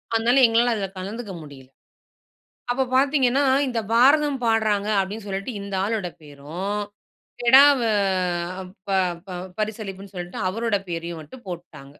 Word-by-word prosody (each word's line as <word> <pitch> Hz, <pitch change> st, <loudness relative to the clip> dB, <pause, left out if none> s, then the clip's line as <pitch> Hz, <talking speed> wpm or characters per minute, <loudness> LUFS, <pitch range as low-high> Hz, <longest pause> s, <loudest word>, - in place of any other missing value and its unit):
அதனால 235 Hz, +4 st, +3 dB
எங்களால 230 Hz, +1 st, +3 dB
அதில 195 Hz, -3 st, -3 dB
கலந்துக்க 205 Hz, +2 st, -6 dB
முடியல. 135 Hz, -3 st, -13 dB, 1.0 s
அப்போ 265 Hz, +1 st, 0 dB
பார்த்தீங்கன்னா, 275 Hz, -1 st, +3 dB, 0.2 s
இந்த 235 Hz, -2 st, -1 dB
பாரதம் 280 Hz, +2 st, +4 dB
பாட்றாங்க 215 Hz, -2 st, +1 dB
அப்படின்னு 205 Hz, +2 st, -5 dB
சொல்லிட்டு 195 Hz, +5 st, -4 dB
இந்த 200 Hz, -1 st, -6 dB
ஆளோட 210 Hz, -4 st, -1 dB
பேரும், 155 Hz, +8 st, -5 dB, 0.6 s
கெடவ 270 Hz, +2 st, +7 dB, 1.1 s
ப -, -, -3 dB, 0.4 s
ப -, -, -11 dB, 0.3 s
பரிசளிப்புன்னு 200 Hz, -2 st, -5 dB
சொல்லிட்டு 175 Hz, +6 st, -6 dB
அவருடைய 215 Hz, -1 st, -1 dB
பேரையும் 170 Hz, -1 st, -4 dB
மட்டும் 205 Hz, -, -14 dB
போட்டுட்டாங்க. 175 Hz, -5 st, -8 dB
210 Hz, 120 wpm, -23 LUFS, 190-240 Hz, 1.1 s, கெடவ